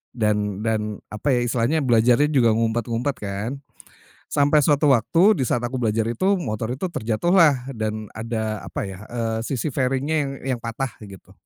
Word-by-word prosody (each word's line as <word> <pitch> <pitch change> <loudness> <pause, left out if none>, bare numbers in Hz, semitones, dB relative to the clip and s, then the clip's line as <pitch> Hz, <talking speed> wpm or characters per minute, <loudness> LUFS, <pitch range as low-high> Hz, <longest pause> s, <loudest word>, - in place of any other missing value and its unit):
dan 105 -2 0
dan 110 -1 0 0.3
apa 105 +7 -6
ya, - - +2
istilahnya 120 +6 +1
belajarnya 125 +4 +3
juga 115 -6 +3
ngumpet-ngumpet 115 +3 -1
kan. 100 +3 -4 0.8
Sampai 145 +1 +3
suatu 145 0 +3
waktu 165 - +3
di 125 - 0
saat 120 - 0
aku 125 +1 -3
belajar 110 -1 +1
itu, 195 - +1
motor 110 - -3
itu 150 - -5
terjatuhlah 135 - +2
dan 110 -2 -4
ada 110 -2 -3
apa - - -5
ya, 95 -1 -7
eee, 115 -2 -2
sisi 135 +2 -2
fairing-nya 135 +4 0
yang 140 - -3 0.3
yang - - -12
patah 115 +3 -4 0.2
gitu. 95 -1 -14
120 Hz, 160 wpm, -23 LUFS, 110-140 Hz, 0.8 s, belajarnya